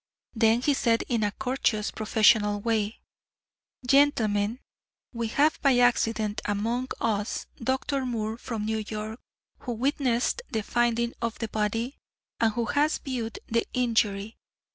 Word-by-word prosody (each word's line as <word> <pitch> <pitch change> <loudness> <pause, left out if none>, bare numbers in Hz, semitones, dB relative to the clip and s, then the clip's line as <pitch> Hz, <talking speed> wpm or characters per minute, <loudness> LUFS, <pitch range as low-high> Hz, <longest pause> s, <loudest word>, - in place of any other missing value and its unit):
Then 225 +1 +3
he 290 - +3
said 230 -4 +2
in 235 -3 +1
a 205 - +1
courteous, 250 -3 -1
professional 215 -1 +3
way: 220 0 -1 0.8
"Gentlemen, 235 -5 +3 0.5
we 235 -1 -2
have 295 +7 +2
by 270 -3 +4
accident 225 -3 +2
among 230 +5 -1
us 210 -2 -1 0.2
Dr. 265 +2 0
Moore 225 -1 -3
from 225 -4 -4
New 220 0 -1
York, 215 +2 -5 0.4
who 245 - -4
witnessed 255 - 0
the 220 -2 -2
finding 235 +1 +1
of 230 -1 -2
the 225 - -4
body, 225 +5 -2 0.4
and 225 -2 +3
who 235 0 -1
has 295 +6 +2
viewed 240 -4 -4
the 230 +1 0
injury. 220 -4 0
230 Hz, 135 wpm, -27 LUFS, 215-245 Hz, 0.8 s, by